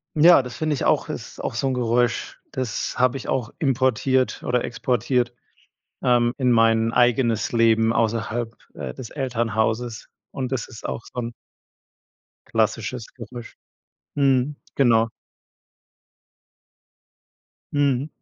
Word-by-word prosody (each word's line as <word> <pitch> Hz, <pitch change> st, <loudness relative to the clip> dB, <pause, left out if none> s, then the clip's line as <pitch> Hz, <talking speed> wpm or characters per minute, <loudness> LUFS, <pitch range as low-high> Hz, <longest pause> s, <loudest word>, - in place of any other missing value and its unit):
Ja, 165 Hz, +1 st, +7 dB
das 125 Hz, -1 st, -8 dB
finde 155 Hz, -1 st, 0 dB
ich 140 Hz, -, -2 dB
auch, -, -, +2 dB
ist -, -, -7 dB
auch -, -, -3 dB
so 135 Hz, -, 0 dB
'n 135 Hz, -, 0 dB
Geräusch, 120 Hz, 0 st, 0 dB
das 130 Hz, -5 st, -3 dB
habe 125 Hz, 0 st, +3 dB
ich 135 Hz, -, -7 dB
auch 125 Hz, -3 st, -1 dB
importiert 130 Hz, -2 st, +1 dB
oder 125 Hz, -1 st, +1 dB
exportiert, 120 Hz, 0 st, 0 dB, 0.7 s
ähm, 120 Hz, -1 st, +3 dB
in 125 Hz, -2 st, +3 dB
mein 115 Hz, 0 st, +3 dB
eigenes 120 Hz, -3 st, +2 dB
Leben 115 Hz, -1 st, +4 dB
außerhalb, 115 Hz, 0 st, -1 dB, 0.2 s
äh, 65 Hz, -, -5 dB
des 120 Hz, -, -8 dB
Elternhauses 115 Hz, -3 st, -1 dB, 0.2 s
und 130 Hz, -1 st, -4 dB
das 130 Hz, -3 st, -2 dB
ist 115 Hz, -, -8 dB
auch -, -, -4 dB
so 125 Hz, -, -3 dB
'n 120 Hz, 0 st, -4 dB, 1.1 s
klassisches -, -, -1 dB
Geräusch. 120 Hz, -2 st, -9 dB, 0.6 s
Mhm, 140 Hz, 0 st, +2 dB, 0.2 s
genau. 115 Hz, -4 st, +4 dB, 2.6 s
Mhm. 140 Hz, -1 st, +1 dB
120 Hz, 120 wpm, -23 LUFS, 115-130 Hz, 2.6 s, Ja